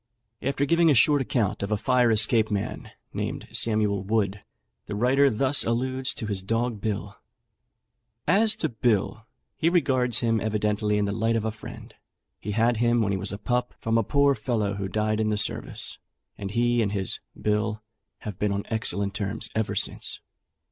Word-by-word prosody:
After 140 +1 0
giving 170 +2 +4
a 145 - +5
short 145 +5 +5
account 115 -6 -1
of 100 +1 -3
a 105 - +2
fire 125 +2 +3
escape 110 0 +4
man, 100 -2 -3 0.2
named - - -4
Samuel 105 -3 +1
Wood, 100 -1 0 0.5
the - - -4
writer 135 +6 +4
thus 135 +4 +2
alludes 130 +3 -2
to 115 - -5
his 100 -3 -3
dog 115 +2 -1
Bill: 105 -3 -3 1.1
"As 210 +6 +4
to 160 - -2
Bill, 110 -1 0 0.3
he 165 - +2
regards 130 -8 +2
him 115 -2 +1
evidently 105 -1 0
in 105 - +1
the 100 - -1
light 115 +2 0
of 110 -1 -1
a 110 - 0
friend; 110 - -11 0.5
he 105 - -4
had 115 +2 +2
him 120 0 +2
when 100 - 0
he 95 - 0
was - - -2
a 100 - -4
pup 125 +3 -2
from 115 0 -1
a - - +1
poor 140 +5 +3
fellow 110 -4 -1
who 100 -1 -3
died 110 +2 -1
in 110 -1 +1
the 105 - 0
service, 105 - -2 0.4
and 100 -1 -6
he 120 +3 +2
and 100 -2 0
his 95 -3 -1 0.2
'Bill' 105 0 -1 0.4
have 105 -4 -7
been 105 -1 +1
on 100 0 -2
excellent 100 -3 0
terms 100 +2 -2
ever 110 -1 -1
since. - - -1
110 Hz, 180 wpm, -26 LUFS, 105-125 Hz, 1.1 s, a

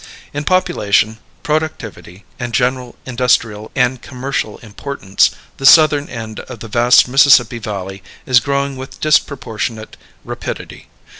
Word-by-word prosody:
In 145 +1 -4
population, 110 - +1 0.2
productivity, 130 - -4
and 120 -2 -4
general 125 0 -1
industrial 120 -4 0
and 125 -1 +1
commercial 130 -4 -4
importance, 105 -2 0 0.3
the 135 - -4
southern 150 -1 +6
end 110 -3 -7
of 125 -3 -10
the 115 - -7
vast 120 +3 +4
Mississippi 125 -3 +4
Valley 95 -3 -6 0.2
is 125 -2 +5
growing 140 +2 -2
with 130 0 -9
disproportionate 120 -7 -1 0.3
rapidity. - - -7
125 Hz, 120 wpm, -16 LUFS, 110-140 Hz, 0.3 s, southern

